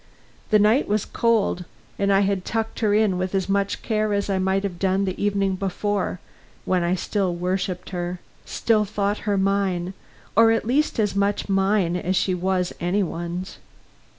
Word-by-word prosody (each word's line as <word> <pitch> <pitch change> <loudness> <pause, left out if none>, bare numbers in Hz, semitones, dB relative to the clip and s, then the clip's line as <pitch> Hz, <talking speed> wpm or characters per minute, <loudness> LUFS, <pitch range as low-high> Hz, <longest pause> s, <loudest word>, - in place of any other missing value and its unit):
The 215 - +5
night 215 +6 +3
was 210 0 0
cold, 225 -6 +1 0.4
and 200 0 +2
I 195 0 +4
had 195 -2 0
tucked 225 +2 -3
her 215 -3 +2
in 205 -3 +2
with 185 +1 -2
as 190 -1 0
much 200 0 0
care 215 -2 0
as 200 0 0
I 190 - +1
might 190 +1 +1
have 180 -4 -4
done 195 +1 +1
the 190 +1 -3
evening 200 -2 +1
before, 195 0 -2 0.5
when 185 -1 +1
I 175 +2 +1
still 190 -1 -1
worshiped 180 +1 -2
her, 175 0 -3 0.2
still 220 -2 +1
thought 205 0 -1
her 200 - +2
mine, 190 -2 0 0.4
or 225 +2 +6
at 225 - +1
least 270 +2 +1
as 205 -2 +1
much 200 +1 0
mine 195 -2 +2
as 180 +1 -1
she 185 +1 +1
was 180 0 0
any 185 +4 +1
one's. 175 +2 -5
195 Hz, 180 wpm, -23 LUFS, 185-205 Hz, 0.5 s, or